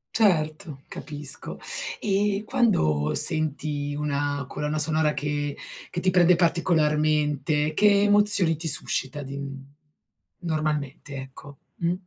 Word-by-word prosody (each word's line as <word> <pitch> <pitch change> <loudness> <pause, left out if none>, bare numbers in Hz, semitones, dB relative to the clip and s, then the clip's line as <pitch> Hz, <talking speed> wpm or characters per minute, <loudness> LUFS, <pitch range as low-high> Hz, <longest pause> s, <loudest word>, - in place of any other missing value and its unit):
Certo, 155 -7 0
capisco. 145 -1 -4 0.4
E 205 0 0
quando 75 - +1
senti 150 -2 -1
una 145 -1 -2
colonna 150 +1 -3
sonora 155 0 +2
che 145 0 -3 0.4
che 175 - -3
ti 185 - +2
prende 180 -1 +4
particolarmente, 155 -3 +1
che 200 +3 +4
emozioni 205 -5 +5
ti 160 +1 -3
suscita 140 -1 +1
di 140 0 -7
n 135 -1 -7 0.8
normalmente? 155 -4 -3
Ecco, 135 +1 -10 0.2
mh? 170 0 0
155 Hz, 110 wpm, -25 LUFS, 145-175 Hz, 0.8 s, emozioni